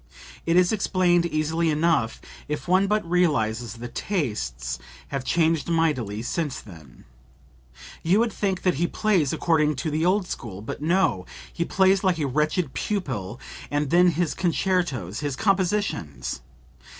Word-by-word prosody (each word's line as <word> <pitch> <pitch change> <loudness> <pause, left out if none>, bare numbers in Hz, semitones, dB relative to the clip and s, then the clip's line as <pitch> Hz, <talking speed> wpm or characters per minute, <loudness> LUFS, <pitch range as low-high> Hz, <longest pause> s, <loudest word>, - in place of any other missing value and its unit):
It 165 - +3
is 180 -1 +5
explained 180 -4 +2
easily 160 +1 0
enough 155 -6 +1 0.3
if 150 +3 -4
one 185 +2 +4
but 210 -3 0
realizes 125 -11 +1
that 120 +1 -8
tastes 65 - -2 0.3
have 140 -2 -3
changed 165 +2 +1
mightily 130 -11 0
since 150 +1 -2
then. 80 - -14 1.0
You 175 +5 +3
would 225 -1 +1
think 190 -3 -1
that 180 - +3
he 175 - +3
plays 190 -11 +1
according 155 -3 +2
to 135 +4 -3
the 155 +2 0
old 185 +3 +2
school; 105 - -6
but 115 - -6
no! 170 - +1 0.3
he 170 - -1
plays 190 +2 +3
like 185 -3 +2
a 155 - -1
wretched 150 +2 0
pupil....And 140 - -3
then 180 +1 +6
his 170 -1 +1
concertos, 170 - 0
his 145 -3 -2
compositions! 190 - -1
160 Hz, 140 wpm, -25 LUFS, 125-180 Hz, 1.0 s, then